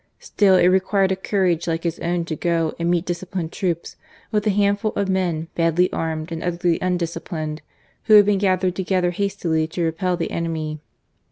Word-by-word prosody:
Still 195 -3 +2
it 180 - +4
required 190 +1 +3
a - - +2
courage 185 -3 0
like 165 0 -1
his 170 -1 -2
own 170 0 -1
to 160 - -3
go 165 -1 0
and 170 0 0
meet 175 0 +1
disciplined 175 -1 -4
troops 170 -3 -3 0.3
with 210 -1 0
the - - +3
handful 205 +2 +1
of 200 -1 0
men 175 -4 0
badly 170 +2 +2
armed 160 0 -3
and 165 0 -4
utterly 175 -1 0
undisciplined, 170 -3 -3 0.4
who 215 - +6
had 205 -1 +8
been 205 -1 +2
gathered 185 -2 +1
together 185 -1 0
hastily 175 -4 -1
to 170 +2 -3
repel 170 +2 0
the 165 - -3
enemy. 160 -2 -3
175 Hz, 180 wpm, -22 LUFS, 165-190 Hz, 0.4 s, had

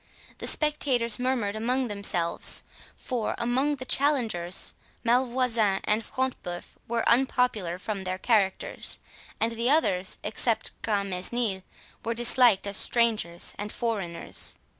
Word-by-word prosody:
The - - -2
spectators 260 -7 +3
murmured 250 -5 0
among 250 +4 0
themselves; 200 -5 0 0.3
for, 245 -4 -3
among 260 +5 +1
the 255 -2 -7
challengers, 230 - +1 0.3
Malvoisin 240 -4 +2
and 215 +2 +1
Front 260 +2 -2
de 180 - -6
Bœuf 175 0 -6 0.2
were 230 0 -1
unpopular 235 -8 +2
from 195 0 -4
their 185 0 -3
characters, 195 -2 +1 0.4
and 225 +1 +1
the 230 +2 -1
others, 195 - +2
except 220 +2 0
Grantmesnil, 200 +1 -1 0.4
were 230 0 -2
disliked 240 -3 +4
as 200 -1 -2
strangers 215 -8 +1
and 205 +1 -4
foreigners. 200 -8 -3
230 Hz, 120 wpm, -27 LUFS, 195-250 Hz, 0.4 s, disliked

